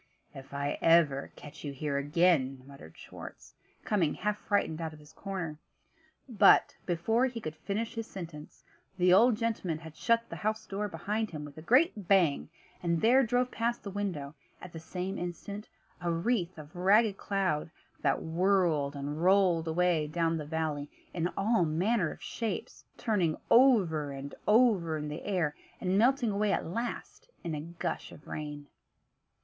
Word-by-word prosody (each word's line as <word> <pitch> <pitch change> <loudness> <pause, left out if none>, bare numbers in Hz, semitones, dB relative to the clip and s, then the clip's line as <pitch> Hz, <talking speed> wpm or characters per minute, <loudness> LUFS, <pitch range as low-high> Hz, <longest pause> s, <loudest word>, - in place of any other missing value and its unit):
"If 135 0 -11
ever 145 +1 +2
I - - -18
catch 150 +1 -11
you 145 - -4
here 140 +1 -2
again," 140 -3 +2
muttered 135 - -13
Schwartz, - - -11 0.3
coming 180 -8 +1
half 210 0 -2
frightened 185 -6 0
out 160 -1 -4
of 155 - -13
his 150 0 -17
corner 180 -6 -5 0.7
but, 210 -5 +5
before 220 +9 +2
he 240 -2 -5
could 155 -8 -5
finish 215 +7 -3
his 225 -1 -5
sentence, 165 -5 -9 0.3
the 180 0 +5
old 225 +3 +6
gentleman 215 -8 -1
had 160 -1 -11
shut 230 +4 +1
the - - -7
house 220 +1 -2
door 205 +2 -3
behind 205 +5 -2
him 150 -2 -6
with 145 -1 -11
a 155 - -9
great 235 - +3
bang: 175 -9 +3 0.3
and 170 -1 +1
there 245 +7 +5
drove 245 +1 +1
past 235 +1 -1
the 200 - -6
window, 180 -8 -3 0.3
at 180 - -11
the 165 - -6
same 180 +4 -4
instant, 200 +4 -6 0.3
a 175 -1 0
wreath 180 0 0
of 155 +3 -11
ragged 200 +3 +4
cloud, 190 -7 -1 0.3
that 140 -1 +1
whirled 165 -4 +1
and 145 +2 -4
rolled 180 -3 +4
away 165 -2 +2
down 165 +1 0
the 150 -2 -4
valley 155 -2 -2 0.2
in 170 -1 0
all 200 -1 +3
manner 175 +4 +1
of - - -11
shapes; 225 -2 -4
turning 185 -9 0
over 190 - +5
and 140 +1 -7
over 210 -8 +4
in 150 0 -4
the 150 - -5
air, 175 -7 -1 0.2
and 185 +2 +1
melting 245 0 +3
away 205 0 +1
at - - 0
last 235 - -5
in 170 -3 -3
a 150 - -3
gush 170 +2 -5
of 150 - -14
rain. 150 -1 -6
175 Hz, 165 wpm, -30 LUFS, 155-210 Hz, 0.7 s, old